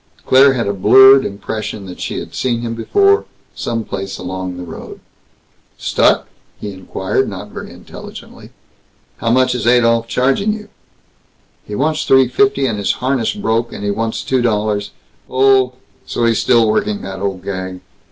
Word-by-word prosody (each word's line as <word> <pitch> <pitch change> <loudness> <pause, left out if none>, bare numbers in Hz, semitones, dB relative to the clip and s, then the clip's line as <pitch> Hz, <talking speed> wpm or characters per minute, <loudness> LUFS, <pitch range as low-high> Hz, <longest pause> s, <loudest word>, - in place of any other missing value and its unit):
Claire 135 +1 +6
had 120 -3 -1
a 100 - 0
blurred 130 +7 +7
impression 105 0 -5
that 90 -1 -10
she - - -3
had - - -7
seen 120 -2 -1
him 115 -1 -3
before, 395 - +2 0.3
some 115 -1 -3
place 95 -2 -5
along 95 -1 -5
the 90 - -6
road. 80 -2 -9 0.8
"Stuck?" - - +2 0.3
he 105 - -5
inquired, 95 0 -2
not - - -8
very - - -8
intelligently. - - -12 0.7
"How 115 - -2
much 130 +1 +3
is 120 -2 -2
Adolph 115 -1 +3
charging 135 - +1
you?" 210 -1 -9 1.0
"He 105 - -5
wants 155 +5 0
three 135 -3 +4
fifty, 140 -1 +2
and 110 -5 -1
his 100 - +1
harness 130 -3 -1
broke, 115 - -1
and - - -7
he 100 - 0
wants 110 +2 -2
two 130 -1 0
dollars 105 -3 0 0.3
" - - -39
"Oh! 130 -1 +3 0.3
So 120 - -1
he's 115 -1 +2
still 115 -2 +3
working 105 -1 0
that 95 -1 -6
old 95 -2 -3
gag! 95 -1 -5
115 Hz, 165 wpm, -17 LUFS, 100-130 Hz, 1.0 s, blurred